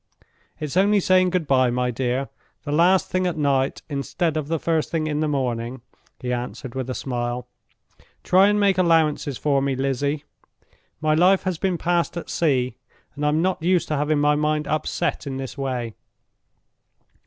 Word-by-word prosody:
"It's 150 -1 -4
only 200 +2 +4
saying 185 -1 +3
good 180 -2 -1
by, 130 -3 +3
my 125 +1 0
dear, 130 +2 -2 0.3
the 145 - -4
last 175 +5 +3
thing 185 0 +1
at 175 - -2
night 140 -2 0
instead 145 +3 -2
of 155 -2 -2
the 165 +1 0
first 160 0 0
thing 160 -2 -1
in 150 -1 -1
the 155 - +1
morning," 125 -3 -2 0.4
he 125 -1 -2
answered, 120 +1 -5
with 130 -1 -4
a 130 - -3
smile. 120 -1 -3 0.8
"Try 190 +2 +5
and 210 0 +2
make 195 -2 +3
allowances 160 -6 +2
for 140 -2 +1
me, 135 -1 0
Lizzie. 140 +2 -1 0.8
My 155 0 +2
life 180 +4 +4
has 185 -4 -2
been 185 -3 0
passed 175 0 0
at 170 - -6
sea; 130 -6 0 0.4
and 145 - -6
I'm 150 +2 +2
not 185 -2 0
used 175 0 +1
to 155 - 0
having 150 +1 +1
my 145 0 +3
mind 150 0 0
upset 155 -1 -2
in 135 -1 -4
this 135 -3 -6
way. 125 -5 -3
150 Hz, 175 wpm, -23 LUFS, 130-170 Hz, 0.8 s, Try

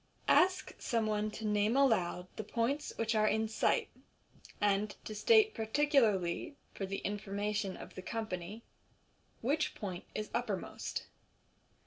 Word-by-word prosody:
Ask 370 +1 +3
someone 215 -3 0
to 215 +1 -6
name 210 +3 +2
aloud 185 -10 +3
the 215 - -4
points 240 +8 -1
which 225 0 0
are 215 -1 +3
cl - - +3
in 220 - 0
sight, 220 - +1 0.7
and 205 0 +1
to 215 - -5
state 435 - +5
par 220 -2 -4
ticularly, 230 - +2 0.2
for 195 - -4
the 195 +1 -4
informa 205 0 -2
tion 200 -3 -2
of - - -10
the 185 - -7
company, 215 0 -4 0.8
which 290 +6 0
point 185 -4 -5
is 215 - -3
uppermost. 225 -6 -3
215 Hz, 140 wpm, -34 LUFS, 200-235 Hz, 0.8 s, state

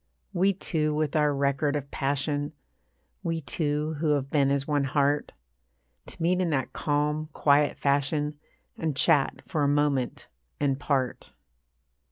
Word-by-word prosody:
We 190 +2 +3
two 155 -5 -1
with 155 -1 -1
our 150 -1 +3
record 140 +1 +1
of 140 -1 -4
passion, 145 +2 -1 0.7
We 165 -1 -1
two 150 +1 -1
who 155 -1 +2
have 140 -1 -2
been 140 -3 +3
as 140 0 0
one 145 -2 +1
heart, 145 +1 +1 0.8
To - - -12
meet 180 +2 +2
in 180 - +1
that 135 -5 -1
calm, 150 +1 0
quiet 145 0 +3
fashion, 145 +1 0 0.4
And 160 -4 -2
chat 135 +1 +2
for 155 - -2
a 145 - +3
moment 145 -3 0 0.3
and 140 -2 +1
part. 135 -4 -1
145 Hz, 145 wpm, -27 LUFS, 140-155 Hz, 0.8 s, We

